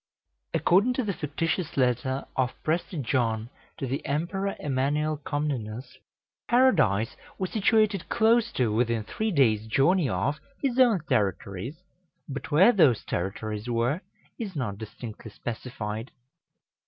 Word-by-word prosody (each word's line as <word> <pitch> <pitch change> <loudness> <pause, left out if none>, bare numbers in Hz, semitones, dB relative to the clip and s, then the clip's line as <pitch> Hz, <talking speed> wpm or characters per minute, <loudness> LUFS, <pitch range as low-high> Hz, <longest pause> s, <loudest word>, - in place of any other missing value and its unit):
According 205 +8 +4
to 255 - -1
the 205 -3 -1
fictitious 165 +2 -2
letter 130 +1 +1
of 130 -1 0
Prester 165 +2 -1
John 120 -4 0 0.3
to - - -3
the 135 +2 -3
Emperor 180 +7 -1
Emanuel 145 +2 0
Comnenus, 130 -5 -4 0.5
Paradise 175 - +3 0.2
was 185 -1 -3
situated 215 -2 +2
close 230 0 +3
to 120 -4 +1
within 115 -1 +1
three 220 - -2
days' 110 - +3
journey 140 - +3
of 130 +12 -1 0.2
his 265 -2 0
own 235 -8 +5
territories, 100 - -1 0.4
but 140 -1 -6
where 175 +10 +6
those 150 - +4
territories 105 +4 -3
were, 120 +8 +1 0.4
is 205 -6 -5
not 105 -8 -3
distinctly 110 0 -8
specified. 115 0 -5
140 Hz, 125 wpm, -27 LUFS, 115-185 Hz, 0.5 s, where